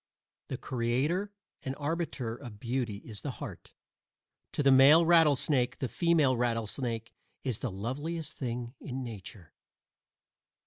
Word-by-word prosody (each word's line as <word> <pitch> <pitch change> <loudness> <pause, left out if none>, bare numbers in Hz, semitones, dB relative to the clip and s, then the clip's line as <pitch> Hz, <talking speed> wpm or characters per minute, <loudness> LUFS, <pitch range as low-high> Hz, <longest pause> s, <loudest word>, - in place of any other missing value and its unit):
The - - -4
creator 135 - 0 0.3
and 135 0 -4
arbiter 145 -6 -2
of 120 -5 -10
beauty 120 -4 -2
is 105 -4 -9
the - - -4
heart; - - -8 0.8
to 145 - -1
the 135 - +6
male 140 +6 +8
rattlesnake 145 -6 +4
the 130 - -2
female 160 -4 +3
rattlesnake 115 0 -2 0.3
is 125 -6 -2
the 130 - -2
loveliest 145 - -4
thing 120 -2 -4
in 130 0 -4
nature. 100 -7 -9
130 Hz, 125 wpm, -31 LUFS, 115-145 Hz, 0.8 s, male